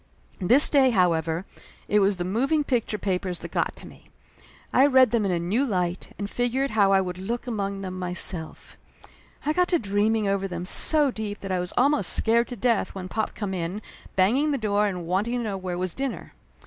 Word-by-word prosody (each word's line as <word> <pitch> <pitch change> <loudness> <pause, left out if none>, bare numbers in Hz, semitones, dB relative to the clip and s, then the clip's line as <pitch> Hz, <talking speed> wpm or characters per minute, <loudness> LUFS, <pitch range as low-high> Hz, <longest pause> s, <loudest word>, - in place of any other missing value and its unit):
This 245 +10 +5
day, 275 -3 +4
however, 170 -4 +1 0.4
it 210 - +3
was 195 -1 +2
the 175 - -2
moving 270 - 0
picture 240 -6 -1
pa 190 -2 -1
pers 180 -2 -5
that - - -8
got - - -1
to - - -12
me. - - -16 0.7
I 270 - +6
read 260 -2 +5
them 230 -3 +1
in 195 - 0
a 175 - +1
new 185 +10 0
light, 180 -7 -2
and 200 - -4
figured 245 +5 -1
how 205 -2 +3
would 180 0 -6
I - - -8
look 235 +6 -4
among 200 -4 -3
them 185 -1 -6
myself. 180 -2 -3 0.7
I 305 - +1
got 360 +2 +2
to 355 - +2
dreaming 210 -1 0
over 195 0 0
them 175 -1 -5
so 295 - +4
deep 210 -3 -6
that 195 - -5
I 185 - 0
was 180 0 -4
almost 280 +3 +2
scared 235 +1 +2
to 245 - -6
death 230 -3 0
when 185 -1 -6
pop 220 +2 -3
come 205 -3 -4
in, 180 +2 -3 0.4
banging 240 +11 +3
the 285 - 0
door 210 -2 +1
and 180 -4 -4
wanting 200 +8 -1
to 240 - -2
know 210 -3 -3
where 185 -2 -4
was 185 -1 -3
dinner. 270 -1 -5
205 Hz, 210 wpm, -25 LUFS, 185-245 Hz, 0.7 s, I